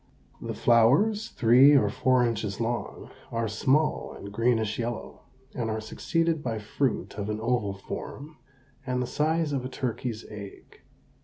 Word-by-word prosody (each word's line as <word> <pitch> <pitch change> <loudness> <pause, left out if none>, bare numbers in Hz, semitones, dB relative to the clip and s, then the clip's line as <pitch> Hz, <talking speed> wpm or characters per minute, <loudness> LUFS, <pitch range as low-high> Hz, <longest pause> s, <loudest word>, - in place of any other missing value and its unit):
The - - -4
flowers, 140 - +3
three 130 +5 +6
or - - +3
four 130 -1 +2
inches 110 -3 -2
long, 120 +1 -3 0.2
are 115 -1 -1
small 135 +8 +1
and 100 - -9
greenish 110 0 +1
yellow, 120 0 -4 0.3
and 120 -4 -2
are 110 0 -2
succeeded 165 +8 -1
by 115 -5 -2
fruit 105 -1 -2
of 100 +1 -3
an 105 0 -2
oval 110 -4 0
form 145 +9 -8 0.5
and 125 -1 -2
the 125 - 0
size 155 +3 0
of 135 -3 -1
a 130 - -4
turkey's 120 -3 -4
egg. 100 -2 -11
120 Hz, 150 wpm, -27 LUFS, 110-135 Hz, 0.5 s, three